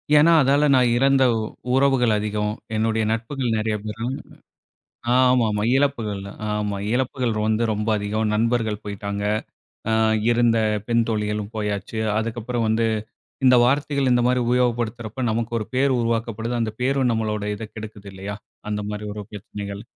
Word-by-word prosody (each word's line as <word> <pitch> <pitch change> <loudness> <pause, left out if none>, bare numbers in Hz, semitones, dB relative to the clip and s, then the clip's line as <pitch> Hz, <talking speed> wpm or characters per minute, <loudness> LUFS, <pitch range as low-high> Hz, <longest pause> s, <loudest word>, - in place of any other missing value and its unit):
ஏனா, 155 +3 +6
அதால 140 +2 +3
நான் 125 -2 +4
இறந்த 135 +1 +4 0.5
உறவுகள் 135 -4 +3
அதிகம். 105 0 -1 0.2
என்னுடைய 110 0 +1
நட்புகள் 120 +2 -2
நெறைய 110 0 0
பேரும். 115 +4 -3 1.0
ஆமாமா, 125 -5 +3
இழப்புகள். 115 -8 0 0.3
ஆமா, 105 -1 -1 0.2
இழப்புகள் 125 -1 0
வந்து 110 +1 +1
ரொம்ப 105 +1 -2
அதிகம். 105 +1 -1
நண்பர்கள் 110 -1 0
போயிட்டாங்க, 100 0 -4 0.7
அ - - +3 0.4
இருந்த 120 -1 +3 0.3
பெண் 115 -1 +3
தோழிகளும் 105 -1 -2
போயாச்சு. 105 0 -3 0.2
அதுக்கப்புறம் 115 +1 -2
வந்து 110 +1 +2 0.6
இந்த 125 -1 +7
வார்த்தைகள் 140 +1 +1
இந்த 120 0 +3
மாரி 125 0 +2
உபயோகப்படுத்துறப்போ 120 -1 0
நமக்கு 115 +1 -2
ஒரு 110 - -4
பேர் 130 0 +3
உருவாக்கப்படுது. 115 0 -1
அந்த 110 -2 -1
பேரும் 130 -1 +2
நம்மளோட 110 -2 -1
இத 110 0 -7
கெடுக்குது 105 -2 -9
இல்லையா? 100 +2 -6 0.3
அந்த 105 0 -1
மாரி 105 0 -5
ஒரு 105 0 -6
பிரச்சனைகள். 100 0 -7
115 Hz, 135 wpm, -23 LUFS, 105-125 Hz, 1.0 s, இந்த